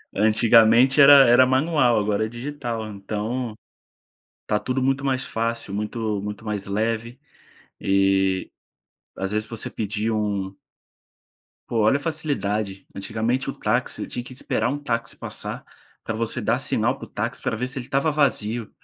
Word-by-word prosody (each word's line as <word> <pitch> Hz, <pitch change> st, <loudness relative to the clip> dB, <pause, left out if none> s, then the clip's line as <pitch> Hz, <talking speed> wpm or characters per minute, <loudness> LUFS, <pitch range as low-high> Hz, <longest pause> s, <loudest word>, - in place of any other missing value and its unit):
Antigamente 115 Hz, +5 st, +5 dB
era 140 Hz, 0 st, +10 dB
era 120 Hz, +2 st, +7 dB
manual, 130 Hz, -2 st, +3 dB
agora 105 Hz, +1 st, 0 dB
é -, -, -3 dB
digital, 120 Hz, -2 st, -5 dB
então, 110 Hz, +3 st, -4 dB, 0.9 s
tá 105 Hz, -, +1 dB
tudo 130 Hz, 0 st, -2 dB
muito 135 Hz, +1 st, +1 dB
mais 135 Hz, -1 st, 0 dB
fácil, 115 Hz, -3 st, -3 dB
muito 105 Hz, 0 st, -2 dB
muito 105 Hz, +2 st, -6 dB
mais 105 Hz, -2 st, -3 dB
leve. 115 Hz, +4 st, -2 dB, 0.6 s
E, 95 Hz, -1 st, +1 dB, 0.7 s
às 95 Hz, +1 st, -3 dB
vezes, 105 Hz, +1 st, -2 dB
você 115 Hz, -, -5 dB
pedia 110 Hz, +1 st, -2 dB
um 100 Hz, -3 st, -2 dB, 1.1 s
Pô, 120 Hz, -, -2 dB
olha 110 Hz, +4 st, +4 dB
a -, -, +1 dB
facilidade, 110 Hz, -11 st, -2 dB
antigamente 115 Hz, +7 st, -2 dB
o -, -, -3 dB
táxi, -, -, -1 dB
você -, -, -4 dB
tinha 120 Hz, -, -5 dB
que 130 Hz, -, -11 dB
esperar 125 Hz, -, -1 dB
um 140 Hz, -, -2 dB
táxi 115 Hz, -5 st, -3 dB
passar, -, -, -5 dB, 0.4 s
pra 115 Hz, -, -3 dB
você 110 Hz, +1 st, -2 dB
dar -, -, +1 dB
sinal -, -, 0 dB
para -, -, -8 dB
o -, -, -17 dB
táxi, -, -, -4 dB
pra -, -, -1 dB
ver 125 Hz, +3 st, -2 dB
se 130 Hz, +1 st, -5 dB
ele 120 Hz, -, -7 dB
estava 140 Hz, +5 st, +1 dB
vazio. 120 Hz, -6 st, 0 dB
115 Hz, 160 wpm, -23 LUFS, 105-130 Hz, 1.1 s, era